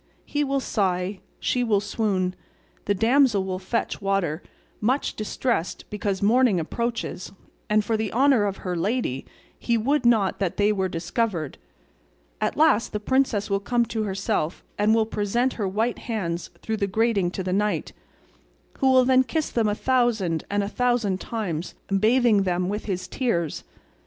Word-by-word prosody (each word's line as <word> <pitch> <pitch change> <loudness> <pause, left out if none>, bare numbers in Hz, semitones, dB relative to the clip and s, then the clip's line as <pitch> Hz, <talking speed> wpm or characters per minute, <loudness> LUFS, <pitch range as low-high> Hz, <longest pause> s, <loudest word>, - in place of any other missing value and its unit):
He 295 0 -1
will 275 -1 0
sigh, 190 -5 -1 0.2
she 250 - 0
will 215 -4 +2
swoon, 200 -3 -1 0.5
the 205 - +1
damsel 230 -1 +3
will 185 -1 -3
fetch 210 +5 -2
water, 195 -5 0 0.4
much 255 +7 0
distressed 215 -3 -2
because 200 -2 -2
morning 230 -2 +4
approaches, 235 +3 -3 0.4
and 210 0 +3
for 225 - +1
the 220 -2 -2
honour 260 -3 +4
of 195 -1 -2
her 180 -1 -1
lady 180 - -1 0.3
he 235 -1 +1
would 275 +6 +1
not 220 -5 +3
that 190 -4 -1
they 205 +1 +3
were 190 -2 0
discovered; 170 - -2 0.8
at - - 0
last 305 -7 +3
the 210 - -1
princess 245 -3 +1
will 200 -1 0
come 235 +3 +1
to 225 -1 -3
herself 195 -4 -2
and 210 +2 +3
will 225 -1 +3
present 225 +4 0
her 205 -4 -2
white 220 +5 -1
hands 175 -7 -3
through 220 0 -2
the 200 -2 0
grating 210 -2 +1
to 190 +1 -4
the 180 0 -2
knight, 210 +2 0 0.9
who 265 -2 +4
will 260 0 +5
kiss 315 +3 -2
them 230 -2 +1
a 205 - 0
thousand 230 -10 +1
and 205 0 0
a - - -2
thousand 230 -4 0
times, 185 -8 -4 0.2
bathing 225 -1 +4
them 180 -1 0
with 210 +1 -3
his 185 -3 -3
tears. 175 - -1
210 Hz, 160 wpm, -24 LUFS, 190-240 Hz, 0.9 s, will